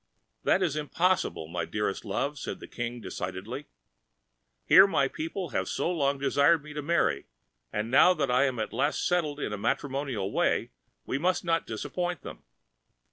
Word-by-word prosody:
"That 190 - +3
is 160 -5 0
impossible, 155 - 0
my 85 +1 -3
dearest 105 +2 -2
love," 140 +8 -2
said - - -5
the - - -9
King 120 0 -5
decidedly—"Here 95 - 0
my 140 -8 +2
people 165 +6 -4
have - - -2
so 175 - -1
long 140 -5 +1
desired 140 +3 +3
me 150 0 -10
to 150 - -3
marry, 170 +3 +1 0.4
and 105 +3 -2
now 180 +7 +6
that 140 -5 0
I 125 +3 +4
am 130 -3 -1
at 110 - -3
last 150 - 0
settled 155 -5 0
in 125 - -2
the 105 - -4
matrimonial 130 -3 -1
way, - - +1 0.3
we 135 - -2
must 180 +3 +1
not 165 -1 +1
disappoint 175 +10 -3
them. - - -9
140 Hz, 165 wpm, -28 LUFS, 110-165 Hz, 0.4 s, now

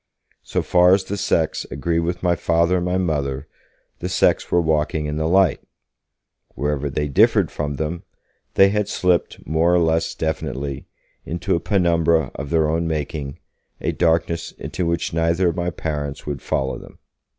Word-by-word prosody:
So - - -2
far 90 +1 +5
as 95 - -2
the 100 - -4
sects 80 -5 0
agreed 80 +4 -1
with 85 +2 -2
my 85 -1 +3
Father 85 +2 +2
and 90 - -1
my 90 +1 +1
Mother, 70 -5 -1 0.5
the - - -3
sects - - +2
were 85 - +4
walking 80 -1 0
in 75 0 -3
the 80 0 0
light; 95 -1 +3 0.9
wherever 70 +1 -1
they 75 +2 -1
differed 70 - +3
from 75 -1 -3
them, 80 +4 -3 0.5
they 95 0 +6
had 105 0 0
slipped 90 -3 0
more 80 +3 +2
or - - +4
less 80 -1 +1
definitely 70 -3 -3 0.4
into 85 +2 -1
a - - 0
penumbra 85 -6 +2
of 70 - -6
their 80 -1 +2
own 80 +2 0
making, 75 -2 -3 0.4
a - - -1
darkness 85 0 0
into 85 +1 -4
which 85 -1 -1
neither 85 +2 +2
of 85 - -3
my 85 0 -1
parents 75 -4 -4
would 70 -3 -4
follow 65 -1 -2
them. - - -14
80 Hz, 170 wpm, -21 LUFS, 75-85 Hz, 0.9 s, they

